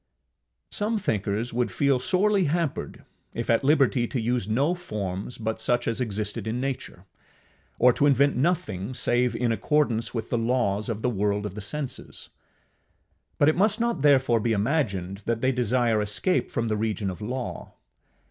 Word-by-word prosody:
Some 215 +2 -1
thinkers 110 - -1
would 120 +1 0
feel 140 -3 +2
sorely 190 +8 +2
hampered 160 0 -2 0.3
if 115 0 -1
at 115 - +2
liberty 135 -4 +3
to 130 - -2
use 120 -2 -1
no 140 +10 +2
forms 105 - -5
but 110 0 -3
such 120 +1 +1
as 115 +2 0
existed 105 -2 -3
in 115 +3 -2
nature, 130 -8 -4 0.7
or 125 0 +5
to 145 - +2
invent 140 +1 +3
nothing 125 - -1
save 125 0 +1
in 120 -2 0
accordance 115 -2 +1
with 115 -2 -5
the 120 - +1
laws 115 -3 0
of 110 -1 -3
the 125 - +2
world 105 -1 0
of 105 - -5
the 105 - -7
senses; 140 +6 -5 1.1
but 145 - +4
it 155 - +4
must 210 +5 +2
not 235 -9 0
therefore 135 -5 +4
be 115 +1 0
imagined 100 - -1
that 115 0 -1
they 130 - +3
desire 120 -2 +1
escape 105 - 0
from 115 -3 -2
the 110 -1 0
region 105 -2 -1
of 90 - -10
law. 125 +4 -5
120 Hz, 165 wpm, -26 LUFS, 110-140 Hz, 1.1 s, or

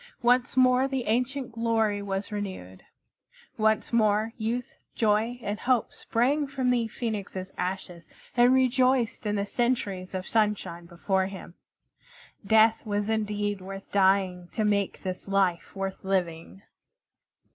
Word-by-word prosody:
Once 245 +1 +3
more 255 +1 +5
the 265 -2 -2
ancient 255 +3 -1
glory 225 -3 0
was 200 +1 -3
renewed. 190 - -6 0.7
Once 220 +1 +1
more 215 0 +2
youth, 235 +2 -3 0.2
joy, 220 +2 +1
and 205 0 -3
hope 250 -3 +1
sprang 275 +6 0
from 265 -2 0
the 235 -2 +1
Phoenix's 200 -5 -5
ashes 180 -2 -4 0.3
and 245 +1 +5
rejoiced 255 -2 +2
in 210 - 0
the 200 -1 0
centuries 200 -6 -1
of 185 0 -4
sunshine 205 -6 0
before 190 +2 0
him. 190 -3 -9 0.9
Death 220 +2 +4
was 205 -1 -2
indeed 205 -2 -1
worth 195 +1 -9
dying 190 -2 +2
to 215 - 0
make 200 -2 0
this 185 0 -5
life 195 -3 0
worth 195 -1 -4
living! 185 -1 -2
210 Hz, 130 wpm, -27 LUFS, 195-240 Hz, 0.9 s, more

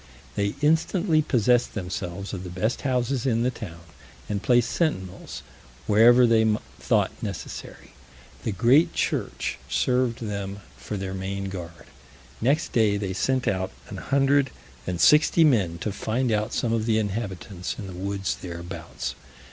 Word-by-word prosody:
They 100 0 -1
instantly 160 +2 +3
possessed 125 -4 +2
themselves 95 0 -4
of 95 -2 -5
the 90 - -6
best 100 +7 -1
houses 130 -1 0
in 115 -2 +2
the 125 - +1
town, 85 -9 -8 0.5
and 100 -2 -2
placed 120 -1 +3
sentinels 95 - -2 0.4
wherever 120 +4 +6
they 115 -1 +4 0.4
thought - - +2
necessary; 100 -6 -7 0.5
the 110 - -2
great 120 - +4
church - - -2
served 125 -2 +1
them 100 -1 -4
for 105 - -6
their 95 -1 -4
main 95 +1 -3
guard. 85 -3 -8 0.6
Next 140 +7 +1
day 110 -4 +3
they 100 -2 -3
sent 130 +6 0
out 95 -1 0 0.2
an - - -6
hundred 140 0 +2 0.4
and 90 -2 -2
sixty 150 - +6
men 100 - +3
to 105 - -1
find 115 +5 -1
out 105 +1 0
some 115 -2 0
of 115 -1 0
the 110 -1 +3
inhabitants 100 -3 -3
in 110 - -6
the 95 - -7
woods 95 +1 -2
thereabouts. 85 -1 -6
110 Hz, 150 wpm, -25 LUFS, 95-125 Hz, 0.6 s, wherever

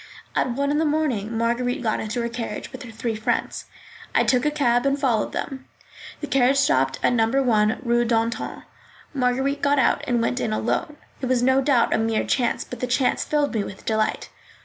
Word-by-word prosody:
At 250 - +1
one 280 +3 0
in 295 - +1
the - - +2
morning 265 -9 -1
Marguerite 240 +2 0
got 220 -2 0
into 230 +3 -3
her - - -1
carriage 230 0 -5
with - - -9
her 250 - -9
three 225 +1 -3
friends. 220 +3 -2 0.5
I - - +5
took 250 +2 +2
a - - +4
cab 245 -5 +1
and 275 +1 +1
followed 240 -6 +1
them. 265 -1 -5 0.5
The 295 - -4
carriage 265 +1 +3
stopped 135 - +2
at - - +3
No. 225 -2 +3
9, 230 -3 +2
Rue 240 -1 +2
d'Antin. 230 0 -1 0.5
Marguerite 265 +1 0
got 285 0 +2
out 265 - +2
and 240 -2 +1
went 245 +2 0
in 220 - -1
alone. 300 +8 -2 0.2
It 260 - -2
was 250 -1 +1
no 260 +1 +4
doubt 260 -4 +2
a - - +2
mere 225 0 0
chance, 245 -3 0
but 250 - -9
the 250 - -2
chance 255 +1 +1
filled 295 -2 0
me 215 -3 0
with 190 - -9
delight. 220 -1 -1
245 Hz, 205 wpm, -23 LUFS, 230-270 Hz, 0.5 s, I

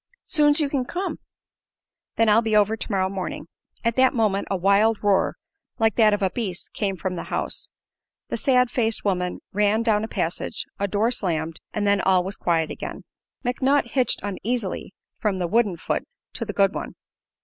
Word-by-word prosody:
"Soon's 295 0 +4
you 300 - +2
kin 275 -2 -1
come." 365 +9 -4 1.0
"Then 225 - +3
I'll 215 +2 +5
be 220 -2 0
over 210 +1 +3
tomorrow 195 -4 -1
morning." 190 -4 -4 0.4
At 230 +1 0
that 260 0 +4
moment 210 -4 +1
a 195 - 0
wild 200 +4 +3
roar, 200 -2 +2 0.4
like 225 -2 +3
that 220 -2 +6
of 205 -1 0
a 190 - +2
beast, 195 -7 -4
came 195 -2 -1
from 180 +1 -3
the 170 - -5
house. - - -2 0.6
The - - -1
sad 250 -3 +3
faced 225 -3 0
woman 180 -2 -1
ran 210 +2 +2
down 215 -2 +2
a - - -2
passage; 175 -6 -3
a 200 - +1
door 210 +4 +1
slammed, 165 -8 -1
and 210 -1 -1
then 200 -1 +3
all 185 -2 +3
was 190 +2 -4
quiet 165 -2 0
again. - - -6 0.4
McNutt 260 +1 +1
hitched 255 -2 +1
uneasily 205 0 -3 0.3
from 205 -3 0
the 180 - -1
wooden 205 -1 +2
foot - - -2 0.3
to 230 - -4
the 205 - -5
good 195 -1 +3
one. - - -5
210 Hz, 180 wpm, -24 LUFS, 190-230 Hz, 1.0 s, that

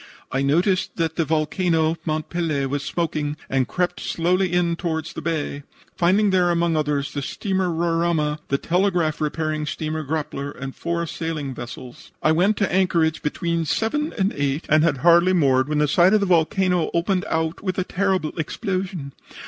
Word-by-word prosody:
I 135 - 0
noticed 175 +7 +1
that 165 -2 -1
the 165 - +1
volcano, 160 +1 +1
Mont 155 -2 -2
Pelee, 160 -5 -1
was 140 +1 -2
smoking, 150 -2 -2
and 135 -1 0
crept 180 -1 -1
slowly 180 +2 0
in 175 -1 +1
toward 160 -3 -2
the 170 -1 -7
bay, 155 -3 -2 0.3
finding 195 +4 +3
there 180 -2 +3
among 170 -1 +1
others 145 -2 -1
the 145 - -2
steamer 190 +5 -1
Roraima, 165 -2 0
the 140 - +1
telegraph 175 -2 0
repairing 155 0 -1
steamer 155 +1 -3
Grappler 145 -1 -3
and 135 0 -5
four 170 0 -2
sailing 160 -4 -4
vessels. 120 0 -9
I 155 - +4
went 185 +6 +3
to 200 -4 0
anchorage 170 -4 +2
between 170 +2 -1
7 295 - 0
and 195 0 +1
8 145 +2 -1
and 155 0 +5
had 160 -4 +2
hardly 175 +2 +6
moored 135 -5 +3
when 150 - 0
the 150 0 +3
side 175 +7 +5
of - - +4
the 200 - +1
volcano 180 0 +2
opened 180 +2 +1
out 160 +1 -1
with 185 -2 -2
a 185 - +1
terrible 190 -4 0
explosion. 180 -3 -3
165 Hz, 175 wpm, -22 LUFS, 150-180 Hz, 0.3 s, hardly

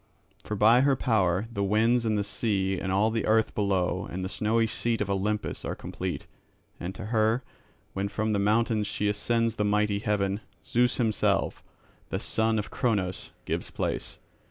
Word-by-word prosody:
For 105 - -3
by 110 +5 +6
her 140 0 +4
power 100 -5 +1
the 100 - -1
winds 115 +4 +2
and 110 -1 +1
the 100 - +1
sea 95 -2 0
and 95 - -3
all 105 +4 +3
the 115 0 -1
earth 110 0 +3
below 100 -3 0
and 95 +1 -4
the - - -3
snowy 110 +4 +1
seat 115 0 -1
of 100 -1 -1
Olympus 105 +2 -1
are - - -3
complete; - - -5 0.5
and 90 +2 -5
to 100 - -7
her, 110 +3 +2 0.5
when 100 +1 -1
from 110 +2 -1
the 100 - +1
mountains 110 +1 +2
she 105 - -1
ascends 115 +2 0
the 105 - +1
mighty 105 0 +1
heaven, 100 -2 0 0.3
Zeus 120 +1 +2
himself, 110 -4 +1 0.5
the - - -2
son 110 0 +1
of 105 - -3
Cronos, 100 -7 -1 0.2
gives - - -2
place. - - -3
105 Hz, 175 wpm, -28 LUFS, 100-115 Hz, 0.5 s, by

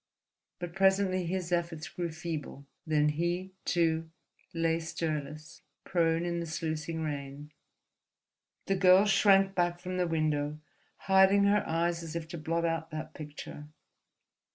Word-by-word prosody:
But 175 -1 -6
presently 190 -1 +2
his 180 0 -3
efforts 170 -1 -1
grew 175 -2 -4
feeble, 155 -4 -6 0.2
then 150 -1 +3
he, 175 +5 -2
too, 165 -2 +1 0.4
lay 165 0 +1
stirless, 155 -2 -5 0.2
prone 165 -1 +1
in 170 0 -1
the 170 - -4
sluicing 160 0 -3
rain. 145 0 -5 1.1
The 195 - 0
girl 185 +1 +6
shrank 195 -1 +4
back 175 -1 0
from 185 +1 -4
the 180 -1 +1
window, 150 -2 0 0.5
hiding 190 +1 +5
her 200 +1 +3
eyes 170 +1 0
as 165 0 -7
if 165 -1 -4
to 170 - -6
blot 165 +2 -1
out 165 -1 -1
that 155 0 -6
picture. 150 -1 -9
165 Hz, 135 wpm, -30 LUFS, 155-180 Hz, 1.1 s, girl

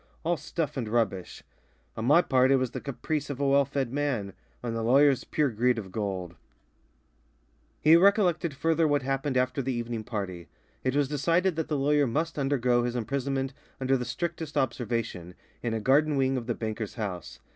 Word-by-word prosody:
all 170 +1 +1
stuff 150 -1 -4
and 120 -4 -2
rubbish. 105 -6 -1 0.5
On 110 - -3
my 150 +7 +6
part, 130 -1 +3
it 135 - +5
was 130 -2 0
the - - -5
caprice 145 +1 -3
of 140 -2 -5
a 140 - +1
well 140 0 +4
fed 135 -2 -3
man; 130 -9 -1 0.3
on 120 -2 -2
the 115 - -2
lawyer's 135 +3 +4
pure 150 -4 0
greed 120 +2 +2
of 95 -4 -6
gold." 95 -5 -4 1.4
He 155 +2 +6
recollected 175 -4 +3
further 160 +3 +2
what 145 -2 +1
happened 135 0 -1
after 125 +2 +1
the 130 0 -2
evening 120 -2 -3
party. 100 -7 -5 0.4
It 130 +1 0
was 145 -1 +2
decided 165 +5 +1
that 160 -1 -2
the 150 - -1
lawyer 145 +1 +3
must 155 +6 -2
undergo 125 -3 +2
his 120 0 -2
imprisonment 135 +3 -2 0.3
under 135 0 +2
the 125 - -1
strictest 150 +4 -4
observation, 115 -9 -2 0.3
in 115 -2 -2
a - - -1
garden 145 +6 +3
wing 135 0 +2
of 120 -3 -4
the 120 - -1
banker's 110 -1 -4
house. 100 -7 -5
130 Hz, 185 wpm, -28 LUFS, 115-145 Hz, 1.4 s, my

